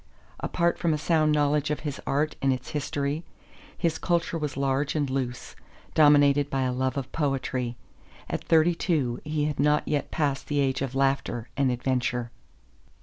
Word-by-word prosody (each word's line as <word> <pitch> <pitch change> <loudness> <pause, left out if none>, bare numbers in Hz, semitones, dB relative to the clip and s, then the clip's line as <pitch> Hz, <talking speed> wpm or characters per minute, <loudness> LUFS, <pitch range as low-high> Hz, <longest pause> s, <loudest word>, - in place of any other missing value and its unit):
Apart 170 0 0
from 165 -2 +2
a - - -2
sound 155 0 +2
knowledge 150 0 +2
of 150 - -2
his 145 -3 -5
art 150 +3 0
and 135 - +3
its 130 -1 -3
history, 145 +1 -2 0.5
his 160 -1 0
culture 170 -1 0
was 150 -4 -3
large 140 +2 0
and 145 -2 +1
loose, 125 -2 -3 0.4
dominated 145 -2 +5
by 135 -1 0
a 130 -1 0
love 130 +2 -1
of 135 -1 -4
poetry. 130 -5 -1 0.5
At - - -3
thirty 165 +1 +4
two 145 -9 0
he 150 -1 -1
had 150 -3 -3
not 150 +1 +2
yet 145 -1 -1
passed 140 -3 -1
the 145 -1 0
age 135 -2 +1
of 135 -1 -3
laughter 135 -3 0
and 140 -2 +2
adventure. 125 -1 -1
145 Hz, 170 wpm, -26 LUFS, 130-150 Hz, 0.5 s, dominated